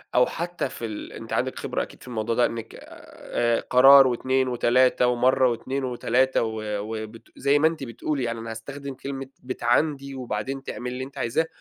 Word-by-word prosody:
أو 125 - +6
حتى 175 -4 -3
في 115 - -6
ال 110 -2 -7
أنتِ - - -8
عندِك - - -1
خبرة - - -2
أكيد - - -12
في - - -14
الموضوع 115 -2 -2
ده، 120 - +4
إنِك 115 -1 -5
آآ، 120 -1 -3
قرار 135 +2 +8
و2 130 +1 +1
و3 125 0 +3
ومرَّة 125 +1 +3
و2 130 +4 -3
و3 130 +1 +1
و 110 -1 -3 0.2
وبت 110 +1 -6 0.2
زي 140 +1 +3
ما 155 - +5
أنتِ 160 -3 -3
بتقولي، 135 +3 -3
يعني 115 -1 -2
أنا 115 0 -6
هاستخدِم 140 +5 -7
كلمة 135 0 -6
بتعاندي 135 +3 0
وبعدين 130 +2 -4
تعملي 125 -2 -5
اللي 130 +1 -4
أنتِ 135 +1 -10
عايزاه، 140 +8 0
125 Hz, 180 wpm, -25 LUFS, 115-135 Hz, 0.2 s, قرار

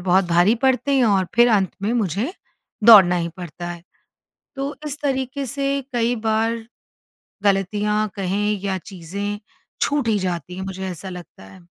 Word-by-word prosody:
बहुत 185 +1 +3
भारी 175 +6 +4
पड़ते 265 +1 +2
हैं 255 - +4
और 195 -4 +2
फिर 240 +1 +6
अंत 195 -4 +2
में 215 +4 0
मुझे, 220 - -1 0.5
दौड़ना 195 -6 +9
ही 170 -1 -1
पड़ता 175 -1 -7
है। 170 -1 -8 0.7
तो 275 +2 -3
इस 290 0 -5
तरीके 270 -1 -2
से 275 +2 -1
कई 240 0 +1
बार 225 +1 +1 0.9
ग़लतियाँ 210 +2 +1
कहें 205 +2 -1
या 190 -1 -1
चीज़ें 200 +3 -6 0.4
छूट 285 -5 +1
ही 215 -2 +2
जाती 180 -1 -3
हैं, 190 - -5
मुझे 190 0 -5
ऐसा 180 +2 -7
लगता 180 - -10
है। 170 - -16
205 Hz, 160 wpm, -21 LUFS, 185-240 Hz, 0.9 s, दौड़ना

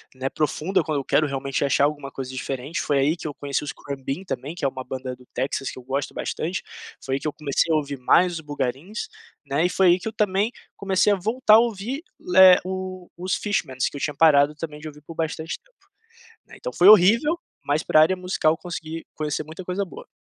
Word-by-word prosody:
né, 130 +1 -2
profunda 155 +6 0
quando 155 -2 -1
eu - - -4
quero 150 +3 +2
realmente 135 0 -2
achar 140 - +2
alguma 145 -1 0
coisa 130 -2 -6
diferente. 135 +5 -4
Foi 145 - +1
aí 145 +5 +2
que 165 - -6
eu 150 - -5
conheci 140 -1 -2
os 150 - -4
Khruangbin 140 +4 -5
também, 155 -3 -5
que 175 - -9
é - - +4
uma 130 -1 -8
banda 130 0 -5
do 125 - -18
Texas 135 +1 -2
que - - -9
eu 130 - -9
gosto 135 +3 -3
bastante, 175 +4 -3 0.4
foi 135 - -1
aí - - -1
que - - -4
eu 150 - -2
comecei 155 +2 0
a - - +4
ouvir 145 -2 -2
mais 170 +6 +3
o - - -12
Boogarins, 145 - -4 0.4
né, 140 +4 +1
e - - +2
foi 190 +1 +3
aí 175 +1 +5
que 185 - -6
eu 220 - -4
também 205 0 +1 0.3
comecei 195 +1 +2
a - - +4
voltar 220 +3 +4
a - - +8
ouvir 235 +4 -2 0.2
le 185 0 +7
o 185 -1 -5
os 185 +2 -1
Fishmans, 135 - -1
que - - -8
eu - - -7
tinha 150 - -2
parado 145 -1 +5
também 150 -1 -7
de 155 - -8
ouvir 150 -1 -11
por 160 +3 -10
bastante 160 0 -3
tempo, - - -33 0.6
né. - - -14
Então, - - -6
foi 180 - +5
horrível, 225 - +6 0.2
mas 145 +2 0
pra 155 - +5
área 165 +4 +4
musical, 180 -4 +1
eu - - -6
consegui 165 -2 -6
conhecer 155 0 -3
muita 160 +4 -9
coisa 185 +2 -2
boa. 180 - -11
155 Hz, 230 wpm, -24 LUFS, 140-185 Hz, 0.6 s, a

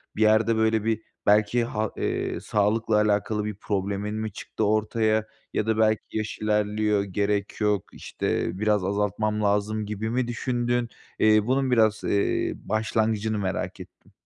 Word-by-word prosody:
Bir 110 - -3
yerde, 110 +1 +4
böyle, 110 -1 +2
bir 110 0 0 0.2
belki, 105 +3 +3
ha 110 -2 -2
iii, - - -2
sağlıkla 105 +1 +1
alakalı 105 0 +1
bir 105 - -4
problemin 100 +1 -2
mi 110 -1 -3
çıktı 105 +2 -4
ortaya 110 +1 +1 0.3
ya 105 - 0
da 110 - +1
"Belki 110 -1 +3 0.2
yaş 110 -1 -4
ilerliyor, 105 -1 +1
gerek 100 +2 -2
yok, 105 -2 +2
işte, - - -2
biraz 105 -2 +2
azaltmam 105 +2 0
lazım." 105 +1 0
gibi 105 +1 -3
mi 125 +1 0
düşündün? 120 0 -1 0.3
İii, 110 0 +4
bunun 130 0 +1
biraz, 110 -3 +3
iii, 100 - +1 0.2
başlangıcını 110 0 0
merak 95 -2 -3
ettim. - - -14
110 Hz, 145 wpm, -25 LUFS, 105-110 Hz, 0.3 s, yerde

